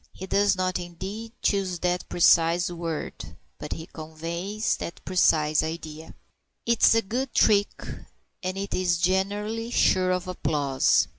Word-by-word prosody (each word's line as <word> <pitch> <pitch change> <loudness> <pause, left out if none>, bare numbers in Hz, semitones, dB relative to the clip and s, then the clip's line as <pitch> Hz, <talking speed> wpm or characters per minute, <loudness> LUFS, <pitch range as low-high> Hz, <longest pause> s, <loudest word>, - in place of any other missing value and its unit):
He 190 - -8
does 200 +1 +2
not, 185 0 -1
indeed, 190 +6 -7
choose 195 -3 +1
that 180 0 -1
precise 170 0 +4
word, 165 -2 -6 0.2
but 150 - -5
he 160 - -7
conveys 170 +7 -4
that 170 - -6
precise 155 -4 +3
idea. 160 -1 -6 0.5
'Tis 235 -1 +4
a 225 - +4
good 250 +6 -3
trick, 205 -1 +4 0.7
and 185 +1 -3
it 200 +1 -4
is 180 -2 +1
generally 205 +5 -1
sure 185 -6 +3
of 180 0 -1
applause. 145 -6 +1
180 Hz, 135 wpm, -26 LUFS, 165-200 Hz, 0.7 s, precise